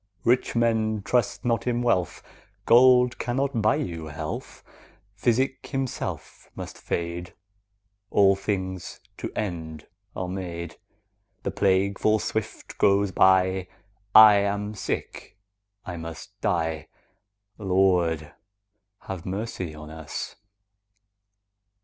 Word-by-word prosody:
Rich 125 +1 +2
men, 110 -3 +1
trust 120 0 0
not 115 0 0
in 120 0 0
wealth, 95 -8 0 0.4
Gold 125 0 +6
cannot 130 0 -1
buy 110 - +3
you 85 -3 -4
health; 75 0 -6 0.5
Physic 130 +5 0
himself 135 -2 -4
must - - -7
fade; 85 +1 -3
10 - - -20 0.8
All 100 -1 +5
things 95 -2 -4 0.2
to - - -5
end 80 -6 -4 0.3
are 90 - -3
made; 85 -2 -5 0.7
The - - -2
plague 95 0 +1
full 110 0 +3
swift 110 0 -4
goes 100 0 +3
by; 95 0 +3 0.5
I 110 -1 +10
am 100 +1 -1
sick, 100 - -5 0.5
I 90 -2 -5
must 80 +4 -8
die— 80 -6 -1 0.7
Lord, 90 -5 +1 0.7
have 95 -3 -6
mercy 95 -4 -4
on 75 0 -10
us! 80 -1 -6
95 Hz, 105 wpm, -25 LUFS, 85-110 Hz, 0.8 s, I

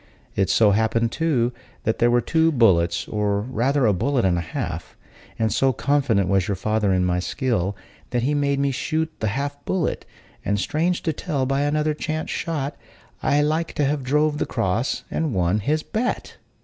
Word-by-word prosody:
It 95 -2 +1
so 110 -2 +5
happened, 110 +2 +1
too, 130 -7 +1 0.3
that 110 - 0
there 120 - +4
were 120 0 +3
but - - -18
two 165 0 +3
bullets, 90 - +3
or, 105 -1 0
rather, 130 +4 +1
a 105 - +4
bullet 120 +5 +1
and 90 -2 +3
a 85 - 0
half; 85 - -5 0.4
and 110 -1 +1
so 135 0 +3
confident 125 -8 +1
was 95 -1 +2
your 100 - 0
father 105 +1 0
in 90 -1 +2
my 90 0 +1
skill, 100 -2 -1 0.3
that 120 -1 -1
he 145 +4 +1
made 140 -1 +1
me 140 0 +1
shoot 160 +4 -1
the 110 - 0
half 140 +6 -3
bullet; 185 -4 -1 0.4
and, 100 0 0
strange 165 - 0
to 160 - 0
tell, 145 -3 -2
by 135 +1 0
another 150 +1 +1
chance 155 +1 -3
shot, 150 -4 -2 0.5
I 145 +1 +3
like 160 +2 0
to 145 - +1
have 145 +1 0
drove 150 +3 +1
the - - -1
cross 115 +2 -1
and 155 -8 -1
won 90 +3 +2
his 155 +9 0
bet." 245 +3 -3
130 Hz, 190 wpm, -23 LUFS, 105-150 Hz, 0.5 s, so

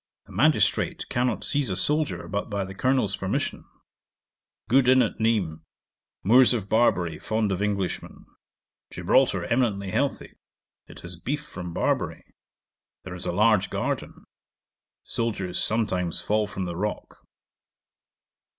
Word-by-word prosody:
The - - -17
magistrate 150 +11 +2
cannot 125 0 0
seize 145 -4 0
a 95 - -1
soldier 150 +7 0
but 100 +2 -3
by 100 -2 -2
the 95 - -8
Colonel's 125 -2 +1
permission. 95 - -3 1.0
Good 130 +1 +4
inn 130 0 +6
at - - -3
Nismes. 105 -9 +1 0.6
Moors 125 +5 +6
of 105 -4 -3
Barbary 95 -7 +2
fond 110 -2 -1
of 95 0 -1
Englishmen. 100 -3 -3 0.6
Gibraltar - - +2
eminently 105 -6 0
healthy; - - -1 0.5
It - - -12
has 90 0 -8
beef 145 +8 -3
from 90 - -7
Barbary; - - -1 0.8
There 95 - -7
is 90 - -6
a - - 0
large 105 +1 +3
garden. - - -3 0.8
Soldiers 100 -6 -1
sometimes 95 -6 0
fall 105 0 0
from 95 -2 -4
the 85 -1 -4
rock. 105 +4 -4
105 Hz, 130 wpm, -25 LUFS, 95-120 Hz, 1.0 s, inn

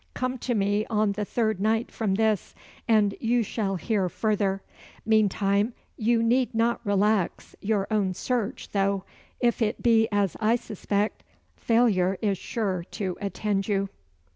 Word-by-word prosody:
Come 255 0 -2
to 245 0 -1
me 205 +1 +1
on 215 -2 +1
the 210 +1 -3
third 220 -2 0
night 220 +3 +1
from 205 -4 -1
this, 215 -2 0 0.3
and 210 -3 +4
you 235 0 +2
shall 200 -2 -2
hear 190 +1 0
further. 200 -1 0 0.4
Meantime, 210 0 +2 0.2
you 230 +1 +2
need 245 +1 +2
not 230 +1 +1
relax 205 -2 0
your 205 -1 0
own 195 -4 +1
search, 245 +2 -2
though, 195 -1 +1 0.4
if 240 -1 +1
it 220 0 0
be 225 -2 +4
as 200 -3 +1
I 225 +1 +3
suspect, 210 -2 -2 0.3
failure 200 -6 +2
is 200 -4 0
sure 195 -6 -2
to 185 -3 -2
attend 200 0 -1
you." 195 -2 0
210 Hz, 145 wpm, -26 LUFS, 195-225 Hz, 0.4 s, and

